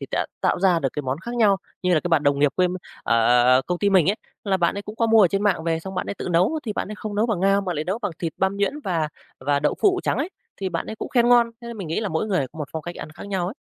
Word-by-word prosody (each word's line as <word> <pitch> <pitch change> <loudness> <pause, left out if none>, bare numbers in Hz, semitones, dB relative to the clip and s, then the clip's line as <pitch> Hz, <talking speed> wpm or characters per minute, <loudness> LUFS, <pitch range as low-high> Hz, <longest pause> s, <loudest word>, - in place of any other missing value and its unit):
thì - - -6
đã - - 0
tạo - - +1
ra 185 -3 +4
được 140 - 0
cái 150 - -3
món 130 +1 -2
khác 235 +6 -6
nhau. 210 -4 +4 0.3
Như 180 -1 +3
là 155 - +3
cái 175 - -3
bạn 165 -4 +3
đồng 140 -1 +2
nghiệp 145 -1 +3
quê 180 -1 +3
m 180 - -4 0.3
ở 115 - +2
ở 120 0 +5
ở 130 - +2
công 180 0 -1
ty 200 +1 +2
mình 190 -1 +5
ấy, 210 - -2 0.3
là 195 -2 +2
bạn 175 0 +1
ấy 200 - -4
cũng 210 +2 -9
có 230 - +2
mua 225 0 +6
ở 185 - +6
trên 195 +3 -1
mạng 190 -6 +1
về 165 -1 0
xong 190 +3 -7
bạn - - -2
ấy - - -3
tự 185 - -5
nấu, 180 - +2
thì 220 -4 -3
bạn - - -3
ấy - - -4
không 210 0 -6
nấu 215 +3 +2
bằng 215 -7 -1
ngao, 195 +1 +3
mà 180 -3 -3
lại 150 +1 -2
nấu 195 +5 -2
bằng 205 -6 -3
thịt 165 -2 -3
băm 190 +1 0
nhuyễn 205 +9 -1
và 165 -5 0 0.3
và 140 +2 +1
đậu - - +1
phụ 380 -3 +3
trắng - - 0
ấy. 290 +5 -1 0.3
Thì 195 - -3
bạn - - -3
ấy 220 - -6
cũng - - -5
khen 240 -2 +3
ngon, 240 -1 +5
thế 235 - -10
nên 235 - -7
mình 195 -5 -6
nghĩ 165 - -1
là 215 - -2
mỗi 160 +5 -1
người 185 -10 0
có - - -12
một 150 -2 -4
phong 160 - -4
cách 175 +2 -6
ăn - - -7
khác 165 - -10
nhau 190 -3 -1
ấy. 195 - -5
190 Hz, 350 wpm, -23 LUFS, 165-210 Hz, 0.3 s, mua